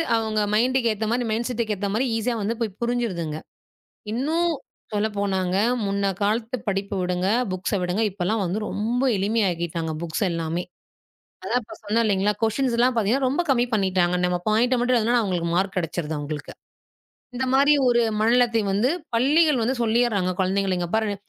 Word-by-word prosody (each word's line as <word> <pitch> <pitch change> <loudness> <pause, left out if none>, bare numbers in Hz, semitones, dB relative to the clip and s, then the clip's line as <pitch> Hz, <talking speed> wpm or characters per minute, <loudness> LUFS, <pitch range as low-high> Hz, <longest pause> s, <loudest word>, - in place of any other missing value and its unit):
அவங்க 220 -1 0
மைண்ட்க்கு 240 +1 +2
ஏத்த 215 +1 -3
மாரி, 245 +1 +1
மைண்ட்செட்க்கு 230 -1 -1
ஏத்த 200 +1 -2
மாரி 235 +5 +1
ஈஸியா 235 +2 -1
வந்து 210 +3 -1 0.3
புரிஞ்சுருதுங்க. 210 -11 -2 0.7
இன்னும் 320 +9 0 0.4
சொல்ல 210 +1 +1
போனாங்க, 190 -2 0 0.3
முன்ன 200 0 0
காலத்து 220 +4 0
படிப்பு 200 0 -2
விடுங்க. 180 +1 0 0.2
புக்ஸ்ஸ 185 +3 -1
விடுங்க. 180 +4 -1
இப்பல்லாம் 200 +3 -1
வந்து 180 +4 -2
ரொம்ப 230 +4 -1 0.2
எளிமையா 205 +2 +1
ஆக்கிட்டாங்க, 165 -1 -3
புக்ஸ் 170 +6 -2
எல்லாமே. 165 +1 -2 0.8
அதான் 250 - 0
இப்ப - - -11
சொன்னேன் 215 +3 +1
இல்லைங்களா? 205 0 +1
குவெஸ்டின்ஸ் 235 +2 +1
எல்லாம் 250 +1 +3 0.3
ரொம்ப 280 +7 0
கம்மி 245 -2 +3
பண்ணிட்டாங்க. 185 -3 +1
நம்ம 180 0 0
பாயிண்ட்ட 240 +4 +3
மட்டும் 250 +1 +2
எழுதுனா 235 +2 +2
அவங்களுக்கு 180 -4 -1
மார்க் 190 +2 0
கிடைச்சுருது 165 -2 -3
அவங்களுக்கு. 145 0 -6 0.8
இந்த 260 +1 -1
மாரி 280 +2 +5
ஒரு 240 -1 +4 0.2
மனநிலத்தை 230 +1 +3
வந்து, 215 +6 +2 0.2
பள்ளிகள் 290 +4 +3
வந்து 235 +4 +1
சொல்லிடுறாங்க 220 -5 +1
குழந்தைகள. 190 0 +1
இங்க 175 - -2
பாரு 220 -2 +1
215 Hz, 150 wpm, -24 LUFS, 185-240 Hz, 0.8 s, மாரி